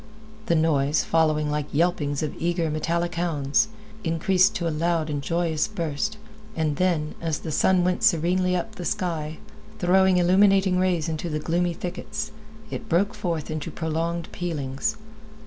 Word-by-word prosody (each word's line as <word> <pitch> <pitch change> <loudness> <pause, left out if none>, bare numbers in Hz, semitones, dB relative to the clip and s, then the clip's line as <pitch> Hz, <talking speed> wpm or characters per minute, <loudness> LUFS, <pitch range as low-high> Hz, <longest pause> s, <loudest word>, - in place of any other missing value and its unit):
This 170 - +3
noise, 150 -2 +2
following 155 -2 +2
like 150 -1 -2
the - - -2
yelpings 150 -4 +1
of 150 - -2
eager, 170 -1 0
metallic 170 +2 -1
hounds, 165 +1 +1 0.4
increased 180 +3 +3
to 170 - -1
a - - 0
loud 165 0 0
and 145 -1 -2
joyous 165 +1 0
burst, 185 +2 -3 0.4
and 155 -3 0
then, 170 -5 +1
as 160 -2 -2
the 160 - -5
sun 180 +4 +3
went 180 +3 0
serenely 180 -2 +3
up 220 +5 -3
the 180 - -7
sky, 165 -5 -2 0.4
throwing 190 +1 +4
illuminating 190 +1 +4
rays 180 -4 +1
into 160 +1 -3
the 155 - -1
gloomy 170 +2 0
thickets, 190 +5 -5 0.4
it - - -6
broke 185 +4 +2
forth 165 -4 -3
into 155 +1 -4
prolonged 165 +1 -2
pealings. 140 -6 -2
170 Hz, 155 wpm, -25 LUFS, 155-180 Hz, 0.4 s, throwing